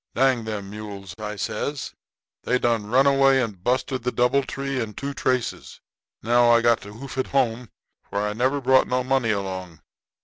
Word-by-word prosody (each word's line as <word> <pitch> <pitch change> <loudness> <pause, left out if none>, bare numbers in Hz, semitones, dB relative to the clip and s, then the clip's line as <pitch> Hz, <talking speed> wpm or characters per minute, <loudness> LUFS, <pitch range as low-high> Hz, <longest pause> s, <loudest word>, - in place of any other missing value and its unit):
'Dang 130 -3 +2
them 100 -3 -5
mules,' 100 -3 -8
I 105 0 -4
says; 140 +7 -3 0.5
'they 125 - +1
done 115 -4 0
run 130 +5 +4
away 135 -1 +5
and 105 -8 -3
busted 130 +2 0
the 125 +1 -1
doubletree 135 +1 0
and 105 -3 -6
two 140 0 -4
traces. 130 -3 -2 0.4
Now 120 +2 +4
I 115 0 +6
got 120 -1 +3
to 105 +1 -10
hoof 130 +3 -7
it 130 - 0
home, 125 -3 0 0.4
for - - -4
I 105 - -2
never 130 +6 +1
brought 130 0 +4
no 125 0 0
money 130 -2 +1
along. 95 -5 -3
120 Hz, 175 wpm, -24 LUFS, 105-130 Hz, 0.5 s, I